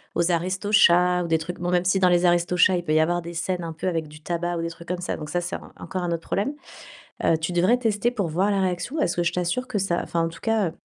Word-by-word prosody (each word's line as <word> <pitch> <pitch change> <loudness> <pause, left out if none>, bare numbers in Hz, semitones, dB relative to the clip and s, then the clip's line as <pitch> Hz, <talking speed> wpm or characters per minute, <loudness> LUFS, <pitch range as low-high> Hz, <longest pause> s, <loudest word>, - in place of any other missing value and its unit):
aux 170 +1 +2
Aristochats 180 0 +3
ou - - -4
des 160 -1 +2
trucs 170 +2 -6
bon, 175 - -2
même 180 0 +1
si 190 +1 +2
dans 185 -1 +4
les 175 0 +3
Aristochats, 175 +1 +3
il 175 - -3
peut 155 -2 -1
y 155 - +4
avoir 175 +2 +1
des 170 +1 -8
scènes 180 +1 -2
un 165 -1 -5
peu 165 +4 -4
avec 165 -3 -1 0.2
tabac 175 0 -2
ou 165 - -2
des 165 - -2
trucs 170 0 -13
comme 180 0 -3
ça. 180 - -2
Donc 150 -1 -7
ça, 175 - 0
c'est 175 +2 -4 0.2
encore 185 - -5
un 175 - -1
autre 165 -1 -2
problème. 210 +9 -1 0.7
Heu, 165 - +3
tu 160 +3 -3
devrais 185 +8 +3
tester 230 0 0
pour 200 -8 -2
voir 185 +6 +1
la 195 -1 +1
réaction, 185 - -2
parce 170 - +1
que 175 - 0
je 170 - +1
t'assure 180 +9 -1
que 210 - -2
ça 175 -3 0
enfin, 170 - -1
en - - -2
tout 165 - -13
cas, 220 -7 +1
175 Hz, 280 wpm, -24 LUFS, 170-185 Hz, 0.7 s, dans